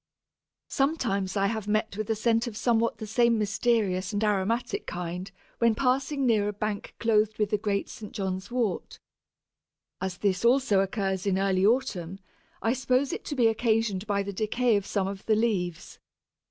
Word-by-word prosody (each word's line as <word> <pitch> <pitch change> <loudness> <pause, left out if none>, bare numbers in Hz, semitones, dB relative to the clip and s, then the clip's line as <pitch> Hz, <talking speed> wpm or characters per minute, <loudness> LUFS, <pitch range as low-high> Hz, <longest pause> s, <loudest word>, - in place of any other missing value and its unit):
Sometimes 230 -10 0
I 195 - +2
have 220 0 -2
met 215 0 0
with 215 +1 -4
a 225 - +2
scent 230 +2 +1
of 220 -3 -6
somewhat 230 -1 +1
the 220 - -6
same 235 +2 +3
mysterious 205 -3 +1
and 205 +1 -1
aromatic 215 - 0
kind 180 +2 -5 0.3
when 230 -2 +3
passing 270 +3 +1
near 215 -4 +3
a 210 - -2
bank 210 0 -4
clothed 215 -1 +2
with 210 -2 0
the 210 - +1
great 200 -1 -1
St. 210 -2 -9
John's 190 -2 -3
Wort. 235 -6 -2 1.0
As 185 -1 -3
this 195 0 0
also 240 -4 +4
occurs 195 -1 -1
in 190 -1 +2
early 190 -1 +1
autumn, 200 -8 0 0.5
I 225 - +2
suppose 260 +1 +1
it - - -5
to 290 - -4
be 245 -4 +3
occasioned 220 -3 +1
by 200 -1 +1
the 200 0 -5
decay 225 +3 +1
of 200 -1 -1
some 195 -2 0
of 195 0 -6
the 220 - +4
leaves. 185 -7 -1
215 Hz, 175 wpm, -27 LUFS, 195-235 Hz, 1.0 s, also